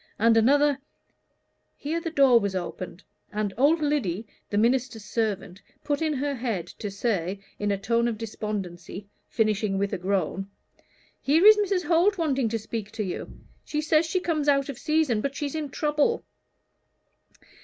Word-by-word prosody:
And 225 +1 +4
another 280 +5 +4 0.5
" - - -48
Here 325 +3 -1
the 330 - -3
door 275 -6 +5
was 200 -3 -2
opened, 185 0 -5 0.3
and 210 -2 -2
old 295 +6 +3
Lyddy, 235 - 0 0.2
the 205 - -1
minister's 235 -1 +1
servant, 200 -4 -2 0.2
put 290 +1 -1
in 315 -1 +1
her 285 +1 -1
head 230 -9 -2
to 210 - -3
say, 195 -3 -1 0.2
in 205 - -1
a 200 - +1
tone 230 +4 +1
of 230 -2 -2
despondency, 200 -4 -5 0.2
finishing 215 -3 +1
with 200 0 -1
a - - -2
groan, 195 0 -1 0.7
"Here 315 +7 +3
is 430 0 +10
Mrs. 395 -3 +1
Holt 360 +4 +3
wanting 275 -8 +1
to 225 - -1
speak 220 -1 -5
to 220 - -2
you; 185 - -5 0.3
she 300 - -3
says 310 +1 +2
she 370 +3 0
comes 310 -5 0
out 275 0 +2
of 270 -3 -6
season, 305 -9 +1
but 275 +2 -3
she's 285 -2 -3
in 310 -2 -3
trouble." 300 - 0
235 Hz, 165 wpm, -26 LUFS, 205-295 Hz, 0.7 s, is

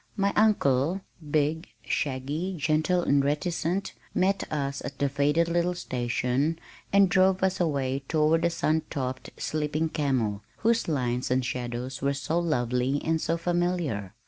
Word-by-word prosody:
My 200 0 +1
uncle, 180 -5 +3 0.3
big, 155 +2 +1 0.2
shaggy, 145 +7 -2
gentle 155 +4 +1
and 140 -3 +3
reticent, 170 +5 -1 0.2
met 195 +1 +1
us 140 -2 -2
at 140 -1 -6
the 140 - +1
faded 145 +4 +2
little 175 +1 +1
station 125 +1 -1 0.3
and 200 0 +6
drove 185 +1 +3
us 190 0 +1
away 140 -5 0
toward 155 +1 +3
the 170 - +3
sun 160 -1 +1
topped 130 -3 -4
"sleeping 155 +1 -1
camel" 130 -10 0 0.2
whose 230 +1 +1
lines 125 -5 -1
and 125 0 +1
shadows 125 +1 -4
were 140 +1 +1
so 155 +5 -1
lovely 125 -4 0
and 160 0 +1
so 165 - 0
familiar. 170 - -1
150 Hz, 145 wpm, -27 LUFS, 130-175 Hz, 0.3 s, and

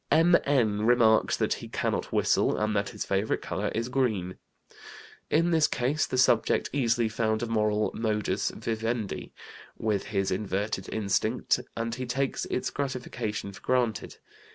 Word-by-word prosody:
M.N. 135 -10 +3
remarks 115 -2 +4
that - - +1
he - - -7
cannot - - -2
whistle, - - +2
and 105 0 0
that 100 0 0
his 105 - -5
favorite 100 +2 0
color - - -2
is 115 +1 -1
green. 110 -9 -1 0.9
In 165 +3 +2
this 160 -2 +4
case 135 +5 0
the 130 - -2
subject 120 -3 +3
easily 120 -4 +2
found 110 0 -1
a - - +1
moral 105 -2 +1
modus 105 -3 -1
vivendi 115 -1 -3 0.5
with 105 -3 -1
his 95 -2 -1
inverted 95 0 -2
instinct, 100 -3 0 0.2
and 115 0 -2
he 130 +2 -4
takes 135 +2 -1
its - - -2
gratification 125 -7 -4
for 95 - -13
granted. 125 -3 -1
110 Hz, 145 wpm, -28 LUFS, 105-125 Hz, 0.9 s, remarks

